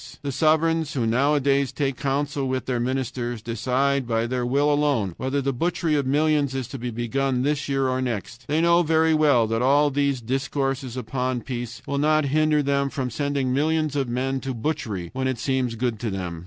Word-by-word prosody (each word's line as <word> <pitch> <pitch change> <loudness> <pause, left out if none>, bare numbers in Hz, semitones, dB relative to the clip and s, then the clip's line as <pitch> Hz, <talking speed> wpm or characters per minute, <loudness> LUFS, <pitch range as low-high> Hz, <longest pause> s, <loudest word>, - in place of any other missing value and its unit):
The 140 - -2
sovereigns, 160 +1 +2
who 125 -4 0
nowadays 140 +3 +2
take 140 -3 -1
counsel 140 0 -1
with 130 0 -2
their 125 -2 -1
ministers, 120 -1 -2
decide 125 +4 0
by 115 -1 0
their 125 0 -2
will 145 +3 +2
alone 140 - +1
whether 135 +2 -1
the 135 0 0
butchery 165 +3 0
of 140 -3 +1
millions 145 -1 +2
is 130 -3 -3
to 135 - -7
be 125 +1 -3
begun 125 +3 -1
this 145 0 -1
year 135 -1 +1
or 130 0 0
next. 120 0 -4
They 155 +2 +1
know 170 +1 +5
very 160 0 +3
well 145 -7 +4
that 115 +1 -1
all 145 +3 +4
these 140 -1 +1
discourses 135 +1 -2
upon 125 +1 -2
peace 120 -2 -6
will 140 0 -2
not 155 0 +3
hinder 155 -1 +3
them 140 0 +1
from 135 -4 -3
sending 140 -1 -1
millions 155 +1 +1
of 135 -3 -1
men 130 +2 -1
to 130 -1 -4
butchery 110 - -3
when 130 0 -1
it 130 -2 -1
seems 130 -1 -1
good 115 -2 -2
to 115 - -2
them. 90 -4 -4
135 Hz, 195 wpm, -24 LUFS, 125-145 Hz, -, know